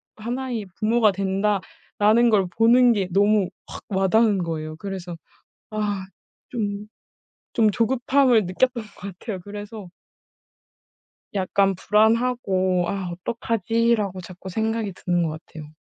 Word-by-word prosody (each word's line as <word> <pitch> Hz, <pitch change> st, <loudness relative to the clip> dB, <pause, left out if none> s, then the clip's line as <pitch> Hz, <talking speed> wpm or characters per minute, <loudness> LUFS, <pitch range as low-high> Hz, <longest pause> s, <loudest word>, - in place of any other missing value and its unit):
하나의 235 Hz, -1 st, -4 dB
부모가 220 Hz, 0 st, +3 dB
된다.'라는 205 Hz, +3 st, +1 dB
걸 200 Hz, -4 st, +3 dB
보는 240 Hz, +2 st, +6 dB
게 195 Hz, -4 st, -1 dB
너무 200 Hz, 0 st, +3 dB, 0.2 s
확 -, -, -9 dB
와닿은 200 Hz, +2 st, +3 dB
거예요. 155 Hz, -1 st, -4 dB
그래서 180 Hz, -2 st, -6 dB, 0.5 s
아 205 Hz, -2 st, -2 dB, 0.4 s
좀 205 Hz, -3 st, -3 dB, 0.7 s
좀 220 Hz, -2 st, +3 dB
조급함을 245 Hz, 0 st, +3 dB
느꼈던 235 Hz, +6 st, 0 dB
것 210 Hz, -, -17 dB, 0.3 s
같아요. 210 Hz, -5 st, -5 dB
그래서 205 Hz, -1 st, -8 dB, 1.5 s
약간 195 Hz, 0 st, +2 dB
불안하고 210 Hz, -3 st, +2 dB
'아 190 Hz, -3 st, -3 dB
어떡하지?'라고 225 Hz, 0 st, 0 dB
자꾸 185 Hz, +1 st, -10 dB
생각이 220 Hz, +1 st, -1 dB
드는 175 Hz, -1 st, -1 dB
것 155 Hz, -1 st, -3 dB
같아요. 155 Hz, -1 st, -11 dB
205 Hz, 255 characters per minute, -23 LUFS, 190-230 Hz, 1.5 s, 보는